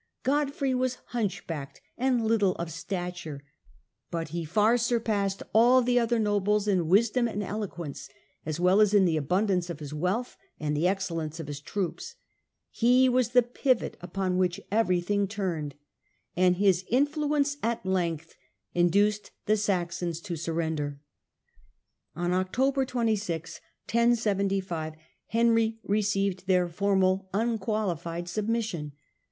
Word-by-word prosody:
Godfrey 280 -1 0
was 255 0 0
Gerstungen - - -28
hunchbacked 175 - -3 0.2
and 250 -2 +1
little 210 -4 +2
of 170 -1 -5
stature, 175 -3 -5 0.7
but 165 -2 -3
he 170 +1 -4
far 210 +8 +3
surpassed 225 -5 0
all 245 +4 +6
the 245 0 +3
other 235 0 +1
nobles 210 -1 +1
in 185 -5 +2
wisdom 230 +6 +3
and 210 -2 -3
eloquence, 185 -7 -5 0.3
as 155 +1 -4
well 185 +4 +4
as 210 -1 +4
in 195 -2 +6
the 165 -3 +2
abundance 180 +4 +1
of 165 -3 -5
his 150 -1 -7
wealbh 185 +11 -1 0.2
and 150 -1 -1
the 160 +4 +2
ex 195 +1 0
cellence 165 -2 -4
of 165 - -5
his 145 -1 -6
troops. 200 - -4 0.6
He 250 +2 +4
was 250 -2 +2
the 245 0 +5
pivot 245 +1 0
upon 185 +1 -1
which 180 -1 +1
everything 200 -1 +1
turned, 175 -8 -3 0.6
and 180 0 +4
his 190 -1 +3
influence 285 +2 +1
at 230 -4 -1
length 170 -4 -1 0.4
induced 200 +4 +2 0.2
the 215 - +3
Saxons 175 -5 -1
to 175 -3 -4
surrender. 160 -3 -2 1.2
On 175 +1 -1
October 260 +9 +1
26, 215 -9 -2 0.2
1075, 195 -8 +1 0.3
Henry 230 -1 +2
received 195 -2 0
their 180 -2 +3
formal 190 +1 +1
unqualified 195 -6 -1
submission. 205 -6 -2
195 Hz, 130 wpm, -28 LUFS, 175-225 Hz, 1.2 s, all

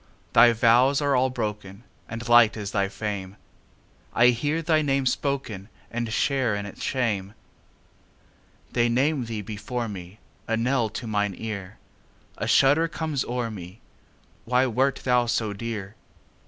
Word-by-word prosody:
Thy 120 +1 +7
vows 120 +4 +4
are 145 -2 +1
all 130 +1 +3
broken, 105 -4 -5 0.3
And 115 +1 -6
light 120 -2 +6
is 105 -1 -5
thy 100 -2 0
fame:I 105 +3 -3
hear 145 +7 0
thy 155 -1 +3
name 135 -2 0
spokenAnd 125 -7 -2 0.4
share 125 -1 +1
in 100 0 -4
its 100 - -10
shame. 105 -6 -1 1.4
They 120 -1 +2
name 135 +2 +1
thee 110 -2 -5
before 110 +4 -4
me,A 100 +3 -7
knell 120 -1 +1
to 110 - -6
mine 105 -3 -1
ear;A 100 -3 -9
shudder 145 +5 +4
comes 155 -4 -2
o'er 120 -1 -2
me—Why 110 +6 -5
wert 130 +2 0
thou 125 -1 +3
so 110 -2 0
dear? 105 -2 -5
115 Hz, 125 wpm, -25 LUFS, 105-130 Hz, 1.4 s, Thy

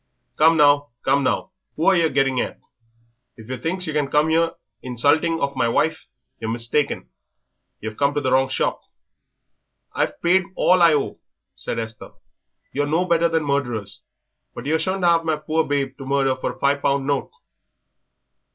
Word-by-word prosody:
Come 160 +1 +5
now, 145 -1 +4
come 140 - +2
now, 160 - -1 0.2
who 160 - -2
are 195 - +5
yer 165 -2 +3
getting 135 -2 +1
at? - - -5 0.8
If 110 +1 -13
yer 130 - -3
thinks 180 +6 -2
yer 155 - -4
can 150 -2 0
come 150 +2 +2
here 165 +1 +2 0.3
insulting 145 +7 +1
of 140 -2 -2
my 120 -3 +1
wife 160 +7 0 0.3
yer 115 - -5
mistaken; 120 +5 -1 0.7
yer've 110 0 -6
come 140 0 +1
to 145 - 0
the 130 -2 -1
wrong 130 0 +3
shop." - - -1 1.1
"I've - - -1
paid 185 +2 +3
all 180 0 +3
I 165 -3 +6
owe," 140 - -2 0.4
said - - -4
Esther. 115 -1 -6 0.6
"You're 145 +1 0
no 165 +5 +1
better 170 -1 +2
than 160 -1 0
murderers, 120 -8 -2 0.5
but 120 - -7
yer 160 +2 +1
shan't 185 +3 -2
have 170 -1 +4
my 160 -1 0
poor 155 +1 -1
babe 140 -2 -1
to 135 - -7
murder 135 -1 +1
for 130 - -4
a - - -19
five 140 +1 +1
pound 140 -1 +1
note." 140 0 -1
145 Hz, 175 wpm, -22 LUFS, 135-165 Hz, 1.1 s, I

